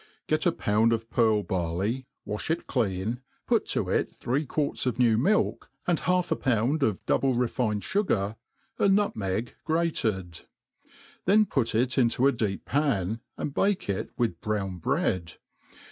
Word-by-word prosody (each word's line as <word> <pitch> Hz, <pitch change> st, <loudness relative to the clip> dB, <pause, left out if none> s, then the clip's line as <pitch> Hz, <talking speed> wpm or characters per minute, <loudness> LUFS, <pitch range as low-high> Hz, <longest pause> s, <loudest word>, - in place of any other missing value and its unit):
.GET -, -, +1 dB
^ -, -, +1 dB
pound 110 Hz, +3 st, +3 dB
of 115 Hz, 0 st, -2 dB
pearl 110 Hz, -3 st, +3 dB
barley, 95 Hz, +8 st, -2 dB, 0.2 s
wa(h 105 Hz, +7 st, -4 dB
it 165 Hz, +1 st, -1 dB
clean, 110 Hz, 0 st, -1 dB, 0.3 s
pat -, -, +1 dB
(o -, -, 0 dB
it -, -, 0 dB
thr^ 130 Hz, +5 st, -1 dB
i}uarts 145 Hz, -2 st, -1 dB
of 125 Hz, -, 0 dB
new 120 Hz, -3 st, +4 dB
milk, 190 Hz, -, +1 dB, 0.2 s
and 175 Hz, -3 st, +2 dB
half 180 Hz, 0 st, +1 dB
a -, -, +4 dB
pound 130 Hz, +4 st, +1 dB
of 110 Hz, -8 st, 0 dB
double 135 Hz, -2 st, +2 dB
refined 115 Hz, -3 st, 0 dB
fugai> 110 Hz, -, 0 dB, 0.4 s
a 200 Hz, -, +4 dB
nutmeg 115 Hz, -, 0 dB
grated 110 Hz, -, -1 dB
i -, -, -36 dB, 0.4 s
then 210 Hz, +3 st, +5 dB
put 120 Hz, -, 0 dB
it 125 Hz, +3 st, +2 dB
into 120 Hz, +1 st, +3 dB
a 140 Hz, -, +6 dB
deep 105 Hz, -6 st, -2 dB
pan, 115 Hz, -8 st, 0 dB, 0.2 s
and 140 Hz, -, -3 dB
bake 195 Hz, +3 st, +1 dB
it 100 Hz, -1 st, -2 dB
wita 115 Hz, -9 st, 0 dB
brown 100 Hz, -4 st, -2 dB
bread. 85 Hz, 0 st, 0 dB
115 Hz, 160 wpm, -27 LUFS, 105-140 Hz, 0.4 s, a